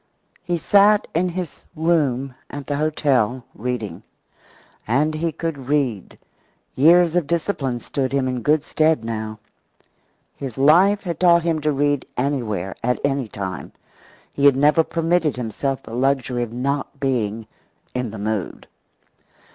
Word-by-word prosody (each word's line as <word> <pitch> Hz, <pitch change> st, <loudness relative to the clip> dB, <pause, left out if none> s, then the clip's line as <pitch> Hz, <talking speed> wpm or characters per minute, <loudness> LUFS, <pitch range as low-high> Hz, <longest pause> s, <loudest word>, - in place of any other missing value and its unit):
He 175 Hz, -1 st, -1 dB
sat 205 Hz, +5 st, +4 dB
in 180 Hz, +3 st, +1 dB
his 175 Hz, -2 st, -5 dB
room 145 Hz, -6 st, +1 dB, 0.2 s
at 145 Hz, -1 st, -7 dB
the 145 Hz, -, -2 dB
hotel, 135 Hz, -6 st, +1 dB
reading. 110 Hz, -6 st, -4 dB, 0.9 s
And 155 Hz, +2 st, +2 dB
he 165 Hz, +2 st, -1 dB
could 150 Hz, -4 st, -5 dB
read. 130 Hz, -9 st, -1 dB, 0.6 s
Years 170 Hz, +4 st, +5 dB
of 175 Hz, -5 st, +1 dB
discipline 145 Hz, -7 st, -1 dB
stood 130 Hz, -2 st, -2 dB
him 135 Hz, -1 st, +1 dB
in 125 Hz, -1 st, -2 dB
good 150 Hz, +3 st, +2 dB
stead 155 Hz, -7 st, +1 dB
now. 110 Hz, -1 st, -4 dB, 1.0 s
His 130 Hz, -5 st, -7 dB
life 180 Hz, +9 st, +5 dB
had 170 Hz, -4 st, -4 dB
taught 170 Hz, -2 st, +5 dB
him 165 Hz, -2 st, 0 dB
to 150 Hz, +1 st, +1 dB
read 145 Hz, -1 st, 0 dB
anywhere, 115 Hz, -9 st, -1 dB
at 125 Hz, +1 st, 0 dB
any 140 Hz, -3 st, 0 dB
time. 95 Hz, -3 st, -6 dB, 0.6 s
He 140 Hz, -, 0 dB
had 140 Hz, -, +5 dB
never 150 Hz, +4 st, +4 dB
permitted 165 Hz, -2 st, 0 dB
himself 125 Hz, +3 st, -3 dB
the 115 Hz, -, -10 dB
luxury 130 Hz, -1 st, 0 dB
of 120 Hz, -2 st, -3 dB
not 140 Hz, +3 st, -3 dB
being 115 Hz, -5 st, -1 dB, 0.5 s
"in 125 Hz, -2 st, -2 dB
the 110 Hz, -, -8 dB
mood." 105 Hz, -2 st, -3 dB
140 Hz, 140 wpm, -21 LUFS, 125-160 Hz, 1.0 s, Years